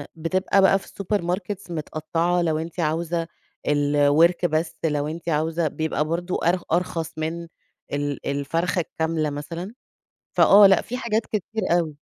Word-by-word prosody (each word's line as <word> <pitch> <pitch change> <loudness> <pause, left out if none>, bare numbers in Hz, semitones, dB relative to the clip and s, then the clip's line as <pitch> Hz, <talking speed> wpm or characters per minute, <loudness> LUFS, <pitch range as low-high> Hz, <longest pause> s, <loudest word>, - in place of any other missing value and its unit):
بتبقى 185 +4 +1
بقى 195 0 +5
في - - -15
السوبر 200 +1 -2
ماركتس 180 +2 -4
متقطعة 165 +2 -1
لو 160 -2 +1
أنتِ 165 +3 -6
عاوزة 165 +1 0 0.4
آآ، - - +1
الورك 145 +4 +3
بس 160 0 0
لو 150 -2 0
أنتِ 165 +2 -5
عاوزة 160 +1 0
بيبقى 155 0 -1
برضه 175 +3 -2
أر 175 +2 +2
أرخص 165 -1 -1
من 165 +2 -3 0.5
ال 145 0 -2
الفرخة 165 +6 -1
الكاملة 160 -1 -2
مثلًا، 165 +7 -6 0.6
فآه 200 +1 +7
لأ 195 -1 +5
في 250 - -5
حاجات 230 -3 0
كتير 215 +1 -3 0.2
أوي. 155 -4 -3
165 Hz, 150 wpm, -24 LUFS, 155-180 Hz, 0.6 s, فآه